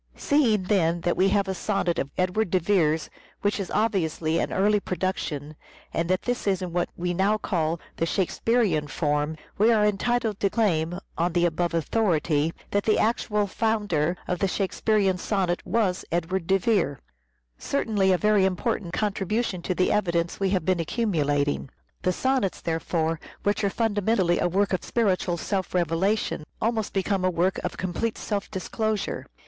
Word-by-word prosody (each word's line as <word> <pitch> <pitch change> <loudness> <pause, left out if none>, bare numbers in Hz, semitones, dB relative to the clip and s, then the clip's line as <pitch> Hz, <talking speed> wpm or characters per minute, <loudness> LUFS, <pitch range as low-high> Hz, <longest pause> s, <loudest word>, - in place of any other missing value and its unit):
Seeing, 235 -9 +2
then, 175 -4 +1
that 175 0 +1
we 190 +1 +3
have 200 0 +2
a 190 - -1
sonnet 190 -2 -1
of 140 - -2
Edward 185 +3 +1
de 185 - +3
Vere's 165 -4 +2 0.4
which 205 +1 +1
is 195 - -3
obviously 170 -6 0
an - - -1
early 205 +2 +3
production, 170 -6 -3 0.4
and 165 +1 -1
that 185 0 +1
this 245 -3 -2
is 190 -2 +1
in 175 -2 -5
what 175 0 0
we 175 +1 -1
now 195 +4 +2
call 165 -5 -1 0.2
the 165 - 0
Shakespearean 190 -3 +1
form, 150 +2 -1 0.2
we 220 +3 +5
are 215 -2 +4
entitled 215 +1 0
to 200 - +2
claim, 175 -6 +1 0.2
on 170 +1 +1
the 175 0 +3
above 170 0 0
authority, 165 -4 +1 0.2
that 205 - +2
the 215 - +3
actual 210 -2 +1
founder 200 -6 0
of 180 -1 -1
the 195 - +2
Shakespearean 195 0 +1
sonnet 185 -3 -1
was 195 -2 +1
Edward 170 +1 -1
de 195 - +4
Vere: 180 - +1 0.6
certainly 210 -8 +1
a 185 - +4
very 210 0 +3
important 190 -1 -1
contribution 205 -1 -1
to 180 +1 -2
the 185 - +2
evidence 170 -4 0
we 195 -1 +1
have 185 -4 0
been 185 -1 +2
accumulat 155 -7 0
ing. 145 -1 -2 0.3
The 185 - +1
Sonnets, 260 -1 0
therefore, 165 -1 -1 0.2
which 205 +1 +1
are 200 - +3
fundamentally 205 -4 +1
a 175 - +1
work 195 +2 +1
of 185 - -1
spiritual 190 -6 0
self 190 0 -2
revelation, 180 +2 0 0.2
almost 225 -2 0
become 195 0 0
a 185 - +3
work 180 +2 +1
of 180 - -3
complete 185 +5 -2
self 205 -2 -3
disclosure. 215 +2 -2
190 Hz, 170 wpm, -25 LUFS, 170-210 Hz, 0.6 s, we